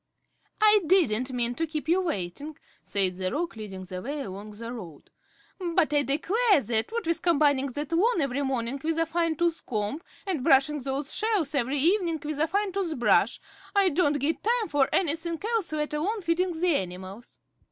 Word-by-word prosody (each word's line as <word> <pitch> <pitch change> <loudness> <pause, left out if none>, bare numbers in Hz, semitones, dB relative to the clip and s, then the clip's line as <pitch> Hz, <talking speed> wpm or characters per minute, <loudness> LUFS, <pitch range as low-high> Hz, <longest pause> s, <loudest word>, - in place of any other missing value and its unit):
"I 425 -1 +6
didn't 260 - +3
mean 240 -1 -1
to 325 +6 -2
keep 310 0 -5
you 355 +3 +3
waiting," 290 - -4 0.2
said 185 -3 +1
the 185 -1 -2
Roc, 335 +2 -2
leading 200 -4 -7
the 185 0 -7
way 285 +6 -4
along 200 -2 -7
the 230 +3 -7
road; 175 -11 -10 0.6
"but 300 - +3
I 290 - +4
declare 380 - +2
that, 230 - 0
what 465 0 -3
with 335 0 0
combing 290 -5 +3
that 290 +2 -4
lawn 375 +5 +2
every 275 -2 0
morning 265 -1 -2
with 325 +1 -1
a 330 - +2
fine 330 0 0
tooth 335 +1 0
comb, 215 +6 -3 0.2
and 355 -10 -2
brushing 275 +3 +4
those 270 +2 -3
shells 415 -10 0
every 275 0 0
evening 335 +1 +2
with 300 -1 -3
a 315 - +2
fine 405 +3 0
tooth 365 -5 -2
brush, 240 - +3 0.4
I 395 -2 +5
don't 300 -2 +2
get 290 +4 -1
time 465 -2 +1
for 285 -3 +2
anything 330 -1 0
else 435 -8 0
let 300 -1 -2
alone 395 +9 -1
feeding 340 0 0
the 350 -2 +3
animals." 185 +5 -7
300 Hz, 185 wpm, -27 LUFS, 245-345 Hz, 0.6 s, I